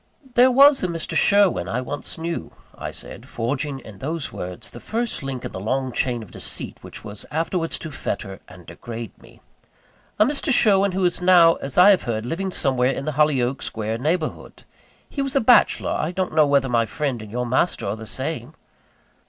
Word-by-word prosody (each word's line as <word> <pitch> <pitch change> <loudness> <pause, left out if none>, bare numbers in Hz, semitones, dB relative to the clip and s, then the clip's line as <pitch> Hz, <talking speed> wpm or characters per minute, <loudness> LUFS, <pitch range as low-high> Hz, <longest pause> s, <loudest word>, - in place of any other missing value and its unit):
"There 250 +2 +6
was 275 +2 +6
a 185 - 0
Mr. 165 -2 -4
Sherwin 200 - +3
I 115 +6 -1
once 145 +3 -5
knew," 165 +1 -4 0.2
I - - -6
said, - - -11
forging 135 +4 -2
in 105 -5 -13
those 155 +1 -4
words 90 0 -7
the - - -10
first 235 +1 -3
link 135 -2 -5
in - - -5
the - - -6
long 130 +6 -1
chain 120 -2 -1
of 105 - -15
deceit - - -5
which - - -11
was 105 -1 -5
afterwards 165 +2 -1
to 160 - -7
fetter 100 -7 -5
and 90 -1 -14
degrade 115 +7 -8
me - - -18 0.8
"a 215 - +5
Mr. 280 +1 0
Sherwin 200 -5 +4
who 190 0 +1
is 175 0 +1
now, 175 -2 +6
as 135 -1 -5
I 185 +3 +8
have 195 - +3
heard, 110 -1 -3
living 185 +9 -3
somewhere 130 -7 +1
in 135 +1 -3
the 155 - -1
Hollyoake 140 -3 +1
Square 110 +1 -3
neighbourhood. 155 +4 -3 0.4
He 280 - -4
was 275 -1 -2
a - - +5
bachelor 245 0 +4
I 155 - -1
don't 185 -1 -2
know 155 -2 +4
whether 140 -1 +3
my 115 -2 +1
friend 135 -3 -3
and 110 - -10
your 125 +2 -2
master 130 +8 0
are 100 - -2
the 110 0 -10
same?" - - -5
145 Hz, 200 wpm, -22 LUFS, 120-180 Hz, 0.8 s, I